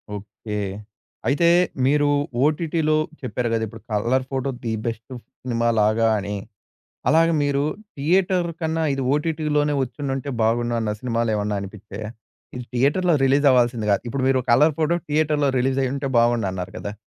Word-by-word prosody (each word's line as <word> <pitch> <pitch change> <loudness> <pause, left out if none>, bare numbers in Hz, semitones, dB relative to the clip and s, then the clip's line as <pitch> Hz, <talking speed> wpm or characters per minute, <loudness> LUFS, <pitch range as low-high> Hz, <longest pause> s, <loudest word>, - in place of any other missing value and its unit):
Okay. 105 +1 -7 0.7
అయితే 145 +6 +3 0.4
మీరు 145 +1 +3 0.4
ఓటిటిలో 155 +1 +1 0.2
చెప్పారు 125 -2 -2
గదా! 115 -1 0
ఇప్పుడు - - -12
'కలర్ 120 +5 +1
ఫోటో' 135 0 -1
ది 115 -2 -2
బెస్ట్ 115 +2 -5 0.3
సినిమాలాగా 115 -2 +2
అని. 100 +1 -4 0.7
అలాగ 165 +1 +5
మీరు 140 -1 +1 0.3
థియేటర్ 175 +4 +2
కన్నా 160 0 -1
ఇది 135 0 -2
ఓటిటిలోనే 150 -1 0
ఒచ్చుండుంటే 135 +1 -4
బాగుండు 120 +1 +1
అన్న 110 -1 -1
సినిమాలేమన్నా 110 -4 -1
అనిపిచ్చాయ? 100 +1 -8 0.5
ఇది 125 -1 -6
థియేటర్‌లో 150 +8 +2
రిలీజ్ 140 +2 +3
అవ్వాల్సింది 120 -3 +2
కాదు. 100 - +3
ఇప్పుడు 130 +2 -2
మీరు 135 -1 +3
'కలర్ 150 +6 +5
ఫోటో' 165 +2 +1
థియేటర్‌లో 150 -1 +1
రిలీజయ్యుంటే 135 +2 0
బావుండన్నారు 110 -6 0
కదా! 100 - -5
130 Hz, 130 wpm, -22 LUFS, 115-150 Hz, 0.7 s, అలాగ